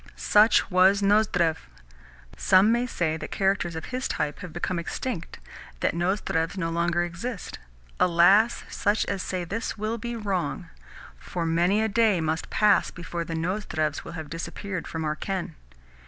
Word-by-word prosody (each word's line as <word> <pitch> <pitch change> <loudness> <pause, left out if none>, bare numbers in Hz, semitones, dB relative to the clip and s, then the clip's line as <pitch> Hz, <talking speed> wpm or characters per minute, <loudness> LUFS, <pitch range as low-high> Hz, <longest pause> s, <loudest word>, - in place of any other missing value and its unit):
Such 215 0 +4
was 190 +2 +4
Nozdrev. 195 -5 +3 0.8
Some 190 +3 +4
may 240 +1 +1
say 160 -8 -1
that - - -7
characters 190 -4 0
of 160 - -5
his 255 +1 -1
type 145 0 -2
have 180 - -8
become 175 +1 -2
extinct, 170 +1 -5 0.4
that - - +1
Nozdrevs 175 -1 -1
no 165 -2 -1
longer 170 +1 +1
exist. 175 +9 -6 0.4
Alas! 185 +6 +4
such 205 +2 0
as 195 -2 -2
say 185 -1 -3
this 220 +6 -4
will 215 +2 -2
be 235 +1 -4
wrong; 190 -5 -3 0.5
for 175 -2 -4
many 175 +6 +2
a - - +2
day 220 -3 +3
must 160 0 -2
pass 210 -1 +3
before 175 -1 -5
the 165 0 -5
Nozdrevs 160 -3 -2
will - - -9
have 160 -2 -6
disappeared 180 +2 -5
from 160 -1 -4
our 150 0 -1
ken. 185 0 -4
180 Hz, 155 wpm, -26 LUFS, 165-205 Hz, 0.8 s, Such